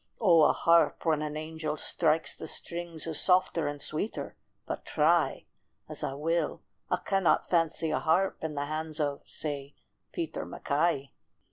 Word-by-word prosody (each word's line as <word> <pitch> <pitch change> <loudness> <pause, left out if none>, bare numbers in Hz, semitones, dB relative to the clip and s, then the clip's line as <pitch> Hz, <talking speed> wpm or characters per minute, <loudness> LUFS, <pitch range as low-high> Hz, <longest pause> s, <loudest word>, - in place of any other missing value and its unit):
O 175 -7 +6
a - - +6
harp 170 +1 +3
when 155 -2 +2
an 150 0 -3
angel 155 -1 -4
strikes 160 0 +1
the - - -8
strings 170 -1 -2
Is 160 -2 0
softer 180 -2 +3
and 145 0 -4
sweeter, 155 +9 -3 0.3
but - - -5
try 160 +2 +2 0.4
As - - -4
I 135 - -2
will, 165 +4 -1 0.3
I - - +2
cannot 195 -3 +1
fancy 165 -2 +2
a 155 - +1
harp 180 +4 +1
In 155 -2 -3
the 145 0 -1
hands 155 +1 -4
of, 145 -2 -1
say, 145 -2 -5 0.4
Peter 160 -2 -4
MacKay. 145 -2 -1
160 Hz, 155 wpm, -29 LUFS, 150-170 Hz, 0.4 s, O